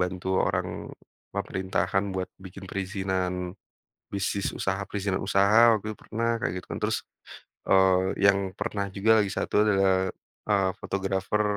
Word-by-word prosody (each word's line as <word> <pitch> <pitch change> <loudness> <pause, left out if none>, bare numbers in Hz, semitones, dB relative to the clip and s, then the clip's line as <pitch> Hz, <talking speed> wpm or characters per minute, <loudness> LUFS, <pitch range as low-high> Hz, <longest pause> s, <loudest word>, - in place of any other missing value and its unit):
bantu 90 0 -2
orang - - 0 0.6
pemerintahan 95 +1 -1
buat 95 0 -2
bikin 95 +1 -10
perizinan, 95 -2 -2 0.6
bisnis 100 0 -1
usaha, 95 +1 -2
perizinan 100 -2 -1
usaha 105 +4 +5
waktu 110 +1 -5
itu - - -19
pernah 115 +1 0
kaya 90 +3 -1
gitu 90 - -8
kan. - - -6
Terus, - - -1 0.6
eee, 95 -1 +5 0.2
yang 100 -1 +4
pernah 100 -1 -2
juga 110 +2 +4
lagi 100 - -1
1 105 - +1
adalah, 95 -2 +3 0.4
eee, 95 -2 +3
fotografer, 95 +2 -1
95 Hz, 135 wpm, -27 LUFS, 95-100 Hz, 0.6 s, usaha